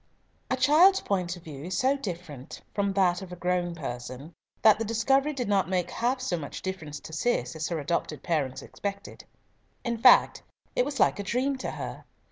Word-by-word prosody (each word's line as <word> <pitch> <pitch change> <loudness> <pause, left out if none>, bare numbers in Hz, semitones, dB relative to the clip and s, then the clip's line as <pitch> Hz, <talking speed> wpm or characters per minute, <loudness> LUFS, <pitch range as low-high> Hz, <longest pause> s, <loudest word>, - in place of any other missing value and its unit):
A 260 - +1
child's 320 +9 +6
point 180 -3 -1
of 175 - -15
view 150 -2 -8
is 180 0 -3
so 265 +2 +3
different 170 - -7
from 200 -1 0
that 185 -2 +2
of 190 -2 -9
a - - -5
grown 175 -1 -1
person, 130 +1 -6 0.3
that 215 -1 +7
the - - 0
discovery 270 +6 +2
did 260 -6 -3
not 195 -4 +2
make 180 -2 0
half 245 +3 0
so 255 -9 -1
much 145 -3 -7
difference 160 -6 -5
to 160 - -10
Cis 160 - 0
as 160 0 -2
her 170 - -2
adopted 155 0 -2
parents 145 -6 -1
expected. 200 0 -6 0.6
In 235 -2 -2
fact - - +6 0.3
it 250 - +3
was 285 -1 -4
like - - +3
a - - -2
dream 255 +7 0
to - - -3
her. - - -6
185 Hz, 195 wpm, -28 LUFS, 160-240 Hz, 0.6 s, that